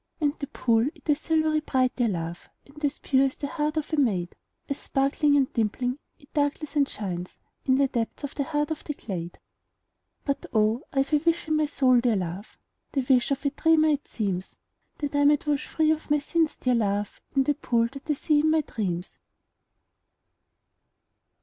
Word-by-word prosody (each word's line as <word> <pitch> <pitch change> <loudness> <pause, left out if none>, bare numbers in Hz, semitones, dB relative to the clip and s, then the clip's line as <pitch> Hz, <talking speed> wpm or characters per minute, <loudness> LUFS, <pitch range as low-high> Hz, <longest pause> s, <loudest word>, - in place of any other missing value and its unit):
And 295 -3 +2
the 280 - -4
pool, 230 -1 +2
it - - -20
is 295 -1 +3
silvery 315 -1 +2
bright, 260 -4 +1
dear 245 -3 +2
love, 170 -3 -4 0.2
And 300 +2 -15
as 290 0 0
pure 270 0 +3
as 265 - -5
the - - -5
heart 300 +2 -2
of 310 +1 -3
a - - +2
maid, 195 -11 +1 0.3
As 280 - -3
sparkling 285 +2 +2
and 270 -2 +1
dimpling, 245 +4 -1 0.2
it 280 - -23
darkles 290 0 -1
and 280 -2 +3
shines 180 -3 -5 0.3
In 260 - +4
the 275 +1 +3
depths 235 -1 -3
of 285 - -4
the 280 - -2
heart 295 0 -1
of 310 - -4
the 295 - -4
glade. 175 -8 -6 0.9
But, 280 -1 -2
oh, 220 +2 +2
I 270 -1 +2
've 280 - -10
a - - +7
wish 335 +2 0
in 310 - +3
my 305 -1 +2
soul, 260 -4 +4
dear 235 -2 +2
love, 185 +2 -5 0.4
(The 270 -3 0
wish 255 -3 +4
of 275 +1 -2
a 280 - +2
dreamer, 315 +1 +4
it 290 -1 0
seems,) 190 -4 -3 0.4
That 290 -1 -3
I 285 0 +3
might 290 0 +4
wash 295 -1 0
free 315 -1 +2
of 315 0 -2
my 295 - +4
sins, 315 +2 0
dear 255 - +1
love, 205 -3 -1
In 270 - +4
the 290 - +2
pool 235 -4 +1
that 275 +3 -11
I - - +4
see 295 +1 +2
in 310 +1 +3
my 315 0 +4
dreams. 185 - -4
275 Hz, 200 wpm, -26 LUFS, 230-300 Hz, 0.9 s, a